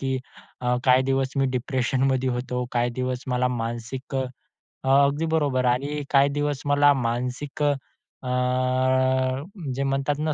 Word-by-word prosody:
की 135 -1 -1 0.4
अ, 125 0 +1
काही 130 0 +5
दिवस 135 0 0
मी 135 -1 +3
डिप्रेशनमध्ये 130 0 0
होतो. 125 0 -2
काही 120 0 +1
दिवस 125 +1 -3
मला 125 0 +1
मानसिक 120 +3 -4
अ 130 - +1 0.6
अ, - - +1
...अगदी 145 +3 +1
बरोबर 145 -5 +1
आणि 140 +4 0
काही 140 0 +5
दिवस 145 -1 -1
मला 145 0 +5
मानसिक 125 +4 -2
अ, 145 -1 +4 0.5
अ, 130 +1 +1 0.3
जे 135 - -1
म्हणतात 135 +1 0
ना, 155 0 0
130 Hz, 145 wpm, -25 LUFS, 125-140 Hz, 0.6 s, काही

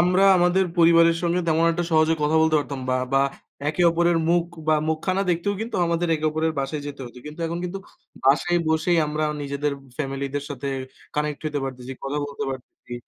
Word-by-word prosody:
আমরা 180 +2 +4
আমাদের 180 +2 +3
পরিবারের 165 0 +6
সঙ্গে 175 +1 +1
তেমন 165 +1 +3
একটা 175 +1 -1
সহজে 160 0 +4
কথা 155 +2 +2
বলতে 160 -1 +3
পারতাম 140 -2 -4
বা 130 - +2 0.2
বা 135 0 +4 0.5
একে 155 +4 0
অপরের 170 0 +2
মুখ 170 0 +3 0.2
বা 155 - +5
মুখখানা 170 +5 0
দেখতেও 175 +4 0
কিন্তু 225 -1 -3
আমাদের 170 0 0
একে 155 0 -1
অপরের 160 +1 0
বাসায় 140 +2 -2
যেতে 145 -1 -7
হতো। 120 +1 -12
কিন্তু 150 +3 -9
এখন 170 +1 -3
কিন্তু 180 +2 -4 0.5
বাসায় 160 +6 +3
বসেই 160 +2 +2
আমরা 150 +1 -1 0.2
নিজেদের 140 +1 -2 0.3
family 135 -1 -2
দের 145 0 -2
সাথে 140 0 -4 0.5
connect 150 -1 -1
হতে 150 -1 -2
পারতেছি, 130 -1 -6
কথা 145 +2 -2
বলতে 145 0 -5
পারতেছি। 125 -1 -10
155 Hz, 190 wpm, -24 LUFS, 145-170 Hz, 0.5 s, পরিবারের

